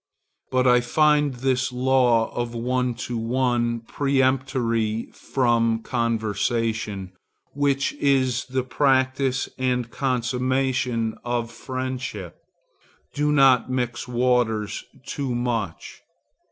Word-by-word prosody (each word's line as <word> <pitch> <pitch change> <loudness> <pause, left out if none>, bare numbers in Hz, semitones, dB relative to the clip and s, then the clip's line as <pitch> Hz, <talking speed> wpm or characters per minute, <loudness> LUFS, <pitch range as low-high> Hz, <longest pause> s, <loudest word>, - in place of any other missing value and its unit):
But 130 0 +1
I 125 -1 +5
find 150 +2 +2
this 130 0 0
law 125 -3 +2
of 120 -1 -3
one 125 +1 0
to 120 -2 -3
one 120 0 0
peremptory 130 -4 0
for 115 -3 +1
conversation, 110 -3 -1 0.4
which 140 -1 +1
is 130 -3 +1
the 130 0 -2
practice 130 0 +1
and 125 -2 0
consummation 125 -2 0
of 120 -1 -2
friendship. 130 -7 -5 0.8
Do 150 +1 +1
not 135 -4 +5
mix 125 -2 -2
waters 120 -4 0 0.2
too 135 -4 -3
much. 115 -7 -3
125 Hz, 95 wpm, -24 LUFS, 115-130 Hz, 0.8 s, I